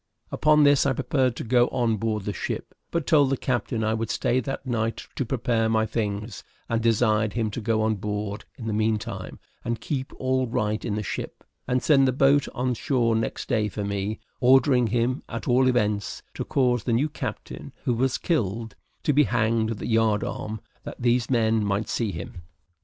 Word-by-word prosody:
Upon 150 0 +4
this 145 -1 +5
I 135 - +2
prepared 130 -1 0
to - - -5
go 120 +1 +3
on 120 -4 0
board 105 -1 -1
the 105 - -3
ship; - - -4 0.2
but 170 -3 -1
told 145 -5 +4
the 135 - 0
captain 120 -3 -1
I 110 0 +1
would 110 0 -2
stay 125 - +1
that 135 +2 -4
night 115 -2 -2
to 135 - -1
prepare 115 -2 0
my 110 0 +2
things, 105 -1 -3 0.2
and 115 -1 0
desired 110 -2 +2
him 110 -2 -1
to 120 - -5
go 110 0 +1
on 110 -1 +1
board 105 +1 -4
in 120 - -7
the 110 - -1
meantime, 110 0 -2 0.3
and 115 -1 -2
keep 135 +1 -3
all 130 0 0
right 110 -1 -1
in 105 -4 -2
the 105 - -2
ship, - - -5 0.2
and 125 0 0
send 135 -3 +5
the - - +3
boat 140 +2 +3
on 125 0 0
shore 120 -3 +1
next 115 - -2
day 110 -3 +1
for 105 0 -4
me; 100 +1 -2 0.2
ordering 130 -1 +5
him, 120 +4 0
at 115 - -5
all 130 +1 +4
events, 105 -5 0
to - - -4
cause 125 -3 +1
the 120 - +1
new 130 +7 +2
captain, 150 - -6
who 125 - +1
was 130 +2 +1
killed, 115 - -1 0.3
to 150 - +2
be 150 +1 +5
hanged 110 0 +1
at 115 - -3
the - - -6
yard 110 -2 +2
arm, 110 0 -5 0.2
that - - -8
these 120 -1 +1
men 110 -3 +2
might 100 +1 -1
see 115 -4 -1
him. 110 -3 -7
115 Hz, 200 wpm, -25 LUFS, 110-130 Hz, 0.3 s, this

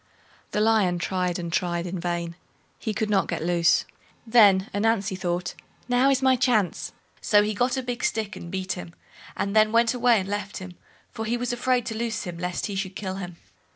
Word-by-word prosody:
The 210 - -1
Lion 210 -5 +3
tried 180 0 -1
and 170 -2 -5
tried 175 -1 0
in 180 0 -4
vain—he 170 +5 -5
could 215 0 -2
not 195 -3 +2
get - - -3
loose. 170 0 +3 0.4
Then 210 -4 +5
Ananzi 205 -2 +1
thought, 180 -1 -2 0.3
now 250 +2 +3
is 270 -1 +2
my 260 -1 +5
chance; 235 -7 +1 0.3
so 205 -1 +4
he 215 +1 -1
got 245 +5 0
a 260 - -2
big 245 0 -4
stick 215 -2 -1
and 170 - -8
beat 190 +1 -3
him, 175 -2 -6 0.4
and 200 +1 -2
then 215 0 +5
went 230 +1 +3
away 245 -2 +4
and 190 - -4
left 205 -1 -4
him, 185 -1 -8 0.4
for 220 - -5
he 235 +2 0
was 245 0 -2
afraid 250 0 +1
to 225 - -4
loose 225 -3 -2
him 175 -2 -6
lest 180 0 -2
he 205 - -4
should 190 -1 -3
kill 190 -2 -4
him. 180 -3 -7
200 Hz, 200 wpm, -25 LUFS, 180-230 Hz, 0.4 s, Then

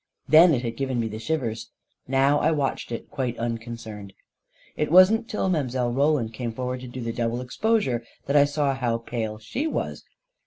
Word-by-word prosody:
Then 160 0 +7
it 120 - -3
had 115 -1 -4
given 130 -3 -1
me 115 - 0
the 110 0 -6
shivers 115 -3 -3 0.2
— - - -47
now 135 +2 +3
I 155 - +2
watched 145 -5 -1
it 115 - -6
quite 125 -4 -2
unconcerned. 115 -3 -5 0.6
It 150 - -1
wasn't 210 +6 +6
till 210 - -1
Mile. 130 -8 0
Roland 140 -4 +1
came 120 +1 -4
forward 125 +1 -3
to 125 - -9
do 125 +1 -7
the 115 -1 -3
double 115 0 -1
exposure 130 - 0 0.2
that 140 - -1
I 145 -1 +7
saw 145 -1 0
how 120 -3 -1
pale 115 -2 -4
she 245 - -3
was. - - -3
125 Hz, 190 wpm, -25 LUFS, 115-145 Hz, 0.6 s, Then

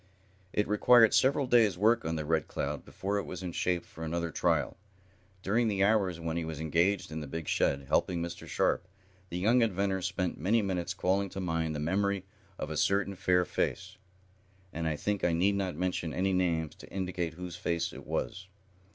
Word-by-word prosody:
It 105 - 0
required 115 +2 +6
several 140 +1 +3
days' 115 -7 +4
work 115 +4 +3
on 80 0 -1
the 80 -1 -3
Red 80 +1 +1
Cloud 70 0 -3
before 100 +1 -2
it - - -3
was 90 +1 -7
in 90 - -3
shape 90 0 -1
for 80 - -10
another 85 +1 -2
trial. - - +1 0.7
During 115 +4 +2
the 100 -2 +1
hours 100 -5 +2
when 80 0 -3
he 85 - -1
was 80 -2 -5
engaged 85 +5 +1
in 80 - -4
the 75 - -6
big 80 +3 -5
shed, 70 0 +1
helping 85 +4 +1
Mr. 85 0 -5
Sharp, - - 0 0.4
the 85 - -4
young 115 +7 +3
inventor 100 -3 +1
spent 90 -1 -2
many 105 +7 +2
minutes 90 -2 -2
calling 95 +1 +1
to 95 - -6
mind 80 -3 -1
the - - -3
memory 95 +4 0 0.3
of - - -4
a - - -3
certain 100 0 +2
fair 90 -1 +2
face, 95 +3 -2 0.8
and 80 0 -2
I 80 - 0
think 100 +5 -2
I 85 - +3
need 95 +5 +3
not 95 -4 -2
mention 90 -1 -2
any 95 +1 +1
names 85 -4 0
to - - -13
indicate 90 -3 -3
whose 90 -1 -6
face 85 -1 -2
it - - -9
was. 95 +1 -3
90 Hz, 195 wpm, -30 LUFS, 85-100 Hz, 0.8 s, required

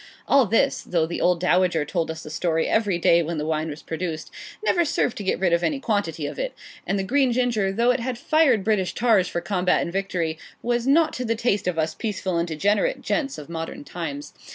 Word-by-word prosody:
All 275 -5 +5
this, 225 +4 +2
though 170 -3 0
the 170 - -4
old 180 -1 +3
dowager 180 -3 +2
told 165 +2 -2
us 160 0 -6
the 155 - -9
story 160 0 0
every 205 -5 +1
day 170 0 +4
when 165 0 -3
the 150 - -2
wine 155 0 -1
was 150 +1 -8
produced, 160 -1 -4 0.3
never 345 - +3
served 285 -6 0
to 205 - -4
get 190 - 0
rid 180 -2 +1
of 170 - +3
any 285 - 0
quantity 200 - -1
of - - -5
it - - -3 0.3
and 195 - 0
the 195 - -1
green 265 +5 +2
ginger, 235 -5 +1
though 235 +5 +3
it 250 - 0
had 245 0 -3
fired 275 -7 +3
British 190 -5 0
tars 215 -6 +3
for 175 - -3
combat 180 0 +1
and 170 - -5
victory, 175 -5 -2 0.2
was 240 +1 0
not 315 +4 +4
to 255 - -3
the 230 -1 0
taste 215 -4 0
of 180 -2 -1
us 160 0 0
peaceful 190 -4 -2
and 170 - -1
degenerate 205 - 0
gents 280 -4 -1
of 150 - -9
modern 165 -2 -6
times. 145 -3 -6
185 Hz, 225 wpm, -24 LUFS, 165-235 Hz, 0.3 s, All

